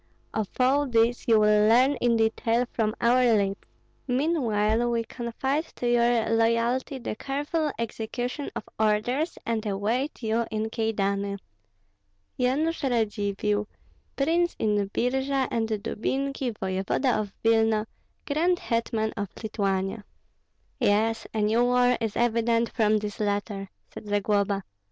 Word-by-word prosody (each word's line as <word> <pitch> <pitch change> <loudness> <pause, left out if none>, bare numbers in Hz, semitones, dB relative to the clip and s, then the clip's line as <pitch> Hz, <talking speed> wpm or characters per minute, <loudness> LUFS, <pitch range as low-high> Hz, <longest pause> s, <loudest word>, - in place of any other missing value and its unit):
Of 215 -3 -2
all 275 +3 +3
this 235 +1 +1
you 225 -2 +5
will 210 0 +4
learn 255 +5 +5
in 235 -1 +2
detail 225 +2 +1
from 215 -1 -1
our 245 +2 +4
lips; 200 -1 -1 0.4
meanwhile 240 -5 +1
we 230 -1 0
confide 265 +6 -2
to 245 - -3
your 240 -1 +3
loyalty 230 +4 +1
the 235 -3 -5
careful 290 +5 -2
execution 240 +4 -4
of - - -4 0.2
orders, 220 +9 +1
and 225 -2 -1
await 225 +7 -2
you 225 +1 0
in 220 0 -2
Kyedani. 200 -3 -1 1.0
Yanush 290 +7 +1
Radzivill, 210 -4 0 0.5
Prince 335 +5 +1
in 205 -2 0
Birji 265 +4 0
and 225 -1 0
Dubinki, 250 +3 -2
voevoda 195 +7 0
of 205 -2 -5
Vilna, 225 -1 +3 0.4
grand 335 +5 +1
hetman 230 -5 -1
of 200 -2 -3
Lithuania. 195 -1 -1 0.8
"Yes, 225 -1 +1
a 220 - -1
new 225 +3 +3
war 250 0 +3
is 220 -2 -2
evident 230 0 +1
from 215 -2 +3
this 210 -1 -5
letter," 205 -1 -2 0.2
said 210 - -9
Zagloba. 205 -1 +1
225 Hz, 125 wpm, -26 LUFS, 210-250 Hz, 1.0 s, you